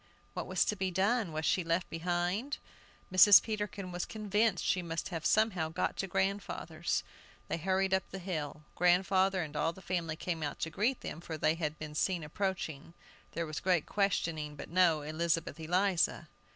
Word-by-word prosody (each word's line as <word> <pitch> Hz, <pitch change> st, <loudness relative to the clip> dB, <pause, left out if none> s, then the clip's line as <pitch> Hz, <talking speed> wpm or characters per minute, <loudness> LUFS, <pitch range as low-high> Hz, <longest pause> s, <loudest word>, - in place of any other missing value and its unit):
What -, -, -4 dB
was -, -, +2 dB
to 210 Hz, -, 0 dB
be 190 Hz, -1 st, -1 dB
done? 195 Hz, +2 st, +1 dB
Was 155 Hz, +1 st, -3 dB
she 185 Hz, -, +2 dB
left 165 Hz, +2 st, 0 dB
behind? 175 Hz, -, -1 dB, 0.6 s
Mrs. 200 Hz, +2 st, +10 dB
Peterkin 205 Hz, -3 st, -4 dB
was 175 Hz, 0 st, -3 dB
convinced 210 Hz, -2 st, 0 dB
she 185 Hz, -, +2 dB
must 165 Hz, -1 st, -4 dB
have 165 Hz, -4 st, -2 dB
somehow 200 Hz, -7 st, +2 dB
got 160 Hz, -, -1 dB
to 195 Hz, -, -2 dB
grandfather's. 190 Hz, -4 st, -1 dB, 0.4 s
They -, -, -1 dB
hurried 190 Hz, +2 st, +1 dB
up 190 Hz, -1 st, +1 dB
the 195 Hz, -, -6 dB
hill. 155 Hz, -5 st, -4 dB
Grandfather 185 Hz, +1 st, +3 dB
and 150 Hz, -1 st, -8 dB
all 165 Hz, +2 st, +1 dB
the 190 Hz, -, -13 dB
family 170 Hz, -3 st, -2 dB
came 165 Hz, 0 st, -3 dB
out 145 Hz, -2 st, -3 dB
to 165 Hz, -, -2 dB
greet 235 Hz, +9 st, 0 dB
them, 165 Hz, -, -6 dB
for 160 Hz, -2 st, -5 dB
they 155 Hz, +1 st, +2 dB
had 155 Hz, -2 st, -3 dB
been 155 Hz, -1 st, -7 dB
seen 175 Hz, +2 st, 0 dB
approaching. 165 Hz, -2 st, -3 dB, 0.4 s
There 170 Hz, -, -2 dB
was 155 Hz, -1 st, -4 dB
great 180 Hz, -4 st, +2 dB
questioning, 165 Hz, -7 st, -1 dB
but -, -, -8 dB
no 170 Hz, -4 st, +4 dB
Elizabeth 165 Hz, +2 st, -1 dB
Eliza! 180 Hz, +3 st, +1 dB
175 Hz, 180 wpm, -32 LUFS, 160-195 Hz, 0.6 s, Mrs